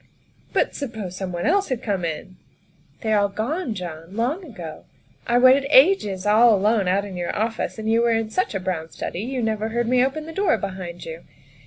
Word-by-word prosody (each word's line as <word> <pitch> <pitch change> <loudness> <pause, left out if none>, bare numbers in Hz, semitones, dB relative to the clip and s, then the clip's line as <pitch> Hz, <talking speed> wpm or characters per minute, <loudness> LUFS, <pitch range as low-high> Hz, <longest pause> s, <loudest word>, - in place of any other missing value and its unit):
" - - -35
But - - +1
suppose 220 -10 -5
someone 180 -2 -4
else 390 +5 +2
had 255 -1 -2
come 195 -5 -1
in?" 170 +3 -5 0.3
" - - -34
They 220 -2 0
are 210 - +4
all 200 - +2
gone, 240 - -2
John 170 0 -7
long 260 - -1
ago. 175 - -9 0.4
I 240 - +3
waited 260 +2 +6
ages 260 - +4
all 220 +2 +6
alone 205 0 +2
out 195 +2 +1
in 195 -2 -8
your 175 -1 -3
office, 225 +2 -2
and 220 0 -5
you 225 +1 +3
were 235 - +3
in 225 -1 0
such 370 - -1
a - - 0
brown 180 -4 -3
study 175 - -5
you 250 +2 -3
never 220 0 -1
heard 235 +1 -1
me 250 +1 +4
open 305 +4 -2
the 325 - -8
door 390 - +2
behind 185 -4 -6
you. 165 +1 -7
220 Hz, 215 wpm, -23 LUFS, 185-250 Hz, 0.4 s, waited